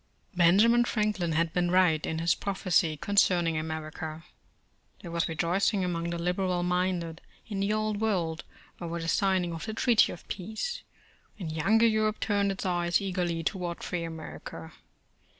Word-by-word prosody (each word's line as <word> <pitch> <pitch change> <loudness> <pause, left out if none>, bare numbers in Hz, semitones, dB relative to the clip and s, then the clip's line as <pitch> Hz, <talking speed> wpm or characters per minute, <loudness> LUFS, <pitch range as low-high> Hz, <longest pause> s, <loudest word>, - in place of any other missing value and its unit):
BENJAMIN 210 +8 +5
Franklin 210 -8 0
had 165 +1 +1
been 175 -1 +1
right 175 -4 +3
in 160 - -2
his 165 +1 +2
proph 200 -1 -4
ecy 165 -4 +2
concerning 175 -4 +2
America. 155 0 -5 0.8
There 170 - -7
was 170 +1 0
rejoicing 180 +4 +1
among 170 -1 -2
the 170 - -3
liberal 180 +1 0
minded 180 -2 -1 0.2
in 205 -3 -4
the 200 +1 +1
old 215 -1 -1
world 175 -7 0 0.4
over 170 0 -4
the 165 - -4
signing 185 -1 +1
of 165 +6 -6
the 220 - -4
Treaty 235 -1 +4
of 175 - -11
Peace, 220 - -4 0.6
and 175 -6 -5
younger 195 +9 +3
Europe 215 -1 +2
turned 200 -2 +1
its 195 - -5
eyes 175 -1 +1
eagerly 180 -4 -2
toward 175 -1 -3
free 175 -1 -3
America. 160 -1 -8
180 Hz, 155 wpm, -28 LUFS, 165-200 Hz, 0.8 s, BENJAMIN